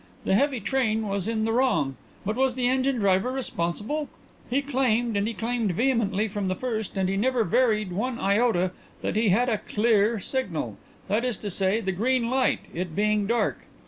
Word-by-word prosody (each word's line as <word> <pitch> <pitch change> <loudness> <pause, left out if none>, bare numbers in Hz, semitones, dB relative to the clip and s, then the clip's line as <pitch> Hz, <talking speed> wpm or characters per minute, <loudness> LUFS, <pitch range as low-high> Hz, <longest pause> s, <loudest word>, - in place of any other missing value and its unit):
The - - +2
heavy 270 +4 +2
train 220 -4 0
was 200 -1 -2
in 220 -1 0
the 225 - 0
wrong. 230 - +1 0.3
But 210 +2 -1
was 260 0 +1
the 250 -1 +1
engine 260 +1 +2
driver 200 +1 +2
responsible? 255 - -3 0.4
He 270 +3 +1
claimed, 245 -5 +1
and 200 +1 +1
he 230 - -3
claimed 230 -4 -1
vehemently 220 -2 +1
from 205 -2 -3
the 185 - 0
first 220 -2 -3
and 190 -1 +1
he 195 - 0
never 245 +3 +2
varied 215 -1 +2
one 235 +7 -2
iota, 200 -3 +2 0.3
that - - -1
he 220 0 +3
had 235 +7 +3
a 220 -4 +1
'clear' 220 0 +2
signal 175 - -3 0.3
that 215 +4 +1
is 250 -5 0
to 205 - -5
say, 195 +4 +1
the 190 -3 -1
green 235 +5 +1
light, 260 0 +2
it 175 -2 -4
being 210 -1 +1
dark. 235 +2 +1
220 Hz, 190 wpm, -26 LUFS, 195-250 Hz, 0.4 s, he